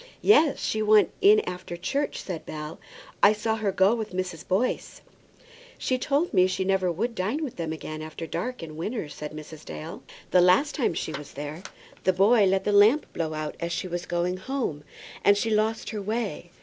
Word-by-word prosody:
"Yes; 320 -8 +5
she 215 - 0
went 215 0 +5
in 420 +2 +7
after 180 - -6
church," 275 +12 -2
said 175 -4 -5
Bell. 150 0 -7 0.4
"I 200 - +7
saw 220 +1 -1
her 210 -3 0
go 190 +3 +4
with 220 -5 -4
Mrs. 180 -3 -4
Boyce." 210 +7 -1 0.8
"She 255 -1 -1
told 290 +6 0
me 185 0 +5
she 185 0 -2
never 190 -2 +2
would 225 +8 -2
dine 225 +10 -2
with 275 - -5
them 165 -2 -3
again 155 0 -6
after 155 +1 -6
dark 250 +5 -4
in 155 -1 -8
winter," 205 -1 -3
said 150 0 -7
Mrs. 155 0 -10
Dale. 75 -1 -8 0.3
"The 180 - +6
last 185 +12 +4
time 245 - 0
she 155 - -3
was 145 0 -8
there, 145 +4 -6 0.4
the 185 - +3
boy 205 +4 +5
let 190 0 +2
the 205 - 0
lamp 210 +9 +4
blow 160 -2 -2
out 155 0 -4
as 170 0 -3
she 185 - -2
was 175 0 -4
going 175 +1 -1
home, 190 - -3 0.4
and 200 0 +5
she 225 +2 0
lost 220 +1 0
her 215 -2 -4
way. 210 -3 -3
190 Hz, 200 wpm, -26 LUFS, 165-225 Hz, 0.8 s, in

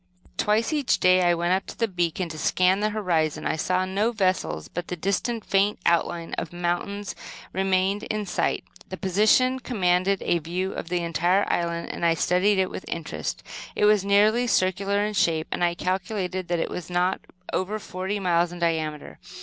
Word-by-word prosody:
Twice, 220 +7 +1
each 290 -4 +1
day, 185 0 +5
I 175 -1 +3
went 175 +1 +1
up 190 +1 -1
to - - -9
the 230 - +1
beacon 175 -2 -1
to 160 - -7
scan 185 +5 +2
the 210 +1 +1
horizon. 175 -8 0
I - - 0
saw 185 +3 0
no 200 +5 0
vessels, 185 - -1
but 175 0 -5
the 180 - -3
distant, 200 +6 -2
faint 200 +1 +2
outline 170 0 +1
of 165 - -5
mountains 175 +3 -2 0.4
remained 190 +1 +1
in 215 -1 -2
sight. 180 - -1 0.3
This 185 - -6
position 215 +7 +3
commanded 190 -5 +1
a 170 - +1
view 180 +4 -3
of 165 - -6
the 175 -1 -1
entire 175 +4 +2
island, 170 -1 -2
and - - -6
I 165 -1 +4
studied 185 +5 +2
it 190 -1 +1
with - - -6
interest. 165 -2 -4 0.3
It - - +2
was 210 -2 +4
nearly 210 +5 +3
circular 200 0 +1
in 210 - -3
shape, 165 -4 +1
and - - -1
I 170 0 +2
calculated 185 0 -2
that 175 - 0
it 165 - -2
was 180 -1 -6
not 180 +1 0 0.3
over 195 +3 -1
forty 190 0 -4
miles 175 -2 +2
in 175 - -8
diameter. 160 -3 -2
185 Hz, 185 wpm, -25 LUFS, 175-200 Hz, 0.4 s, day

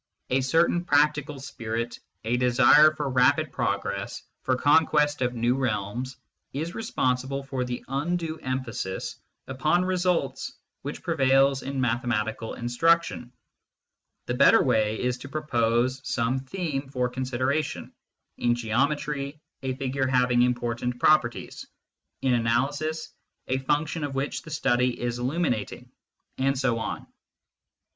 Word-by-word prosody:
A 130 +1 +3
certain 165 +6 +2
practical 150 -2 +2
spirit, 115 -3 -4 0.2
a 115 +2 0
desire 125 +5 +6
for 145 -2 -2
rapid 130 +4 +3
progress, 100 0 -2 0.2
for 130 - +1
conquest 150 +1 +3
of 125 -1 0
new 120 +1 +2
realms, 125 0 -2 0.4
is 160 +6 -3
responsible 135 - -1
for 135 -2 -3
the 125 -1 -5
undue 160 +4 -2
emphasis 130 -7 -4 0.3
upon 155 +7 +1
results 185 +9 0 0.3
which 145 +2 -6
prevails 135 -4 +3
in 135 0 -4
mathematical 115 -3 -1
instruction. 125 +1 +1 0.9
The 120 - -2
better 140 +3 +6
way 110 -4 +1
is 125 0 -1
to 140 - -9
propose 125 -3 0
some 125 +1 0
theme 140 -1 -4
for 125 -2 0
consideration 130 +4 -2 0.5
in 120 0 +2
geometry, 140 +5 -1 0.2
a 130 -1 -2
figure 135 0 -1
having 125 -1 +3
important 120 0 0
properties; 125 -4 +1 0.6
in 130 -2 +3
analysis, 140 +7 0 0.3
a 130 +1 0
function 150 +3 -1
of 140 -2 -3
which 135 +2 -2
the - - -12
study 125 -4 +1
is 120 0 -2
illuminating, 125 - -2 0.5
and 135 +1 +1
so 130 -3 +1
on. - - -4
130 Hz, 120 wpm, -26 LUFS, 120-145 Hz, 0.9 s, desire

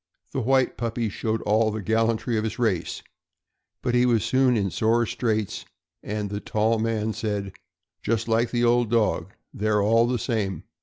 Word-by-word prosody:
The 135 - -2
white 130 +2 +2
puppy 115 -1 -2
showed 110 +2 -2
all 110 +2 +3
the 110 0 -3
gallantry 115 +2 +1
of 110 - 0
his 110 -1 -3
race, 110 -8 -1 0.8
but 120 - 0
he 125 0 +4
was 115 -4 +2
soon 130 -2 +3
in 100 -3 0
sore 115 +2 +2
straits, 110 -3 -2 0.4
and 105 -1 -4
the 100 - -3
tall 110 +2 0
man 110 -1 -1
said: 100 -3 -3 0.5
"Just 115 0 -1
like 115 +1 +2
the 120 -1 0
old 120 -1 +3
dog. 115 -2 +1 0.2
They're 105 0 +1
all 115 +3 +4
the 125 0 0
same. 100 - -2
110 Hz, 170 wpm, -25 LUFS, 105-120 Hz, 0.8 s, he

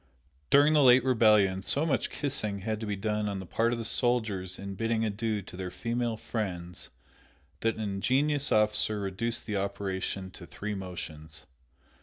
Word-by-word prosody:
During 145 +2 +6
the 150 - +5
late 125 -2 +7
rebellion, 105 -7 +4
so 140 +9 +1
much 145 -5 0
kissing 110 -9 -2
had 110 +1 -2
to 110 - -5
be 105 - -1
done 105 +1 -1
on 100 - -3
the 95 - -7
part 115 +6 +1
of 120 - -1
the 115 - -4
soldiers 110 -7 +1
in 100 0 -6
bidding 115 +2 0
adieu 110 0 -2
to - - -11
their 90 0 -4
female 115 +3 -2
friends 90 -6 -5 0.7
that 115 0 0
an 110 - -6
ingenious 135 +9 +1
officer 105 0 +2
reduced 105 +4 -2
the 105 -2 -2
operation 95 -1 -3
to 85 -2 -12
three 100 +7 -5
motions. 80 -5 -7
105 Hz, 170 wpm, -29 LUFS, 95-115 Hz, 0.7 s, late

